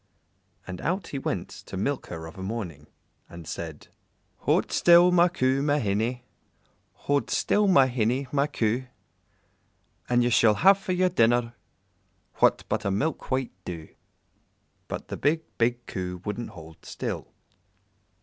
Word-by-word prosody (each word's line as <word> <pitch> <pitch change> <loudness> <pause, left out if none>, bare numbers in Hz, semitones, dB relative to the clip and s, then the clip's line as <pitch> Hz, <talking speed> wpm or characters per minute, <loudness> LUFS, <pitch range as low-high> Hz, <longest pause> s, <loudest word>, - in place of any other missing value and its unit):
And 90 -1 -7
out 180 +2 -2
he 140 - -4
went - - -3
to 95 - -9
milk 135 +8 -2
her 80 -2 -7
of 80 - -10
a 95 - -9
morning, 95 -8 -5 0.4
and 85 -2 -10
said 80 -3 -7 0.5
"Hold - - +1
still, 175 +1 +6
my 175 0 +5
Coo, 135 -6 +1
my 145 0 +2
hinny, 115 +2 -1 0.8
Hold 145 0 +1
still, 210 0 +2
my 160 -9 +6
hinny, 125 +1 0
my 140 0 +2
Coo, 120 -2 -1 1.2
And 120 0 +3
ye 120 - +1
shall 110 -2 +5
have 195 - +5
for 190 -1 -2
your 185 0 +2
dinner 120 -6 +2 0.8
What - - +3
but - - -1
a 100 - 0
milk 140 +11 -2
white 130 -1 -1
doo." 85 -4 -7 1.0
But - - -6
the - - -4
big, 160 +3 +1 0.2
big 120 +1 +1
Coo 90 -1 -5
wouldn't 105 +3 -4
hold 80 -3 -13
still. - - -5
120 Hz, 150 wpm, -26 LUFS, 100-145 Hz, 1.2 s, still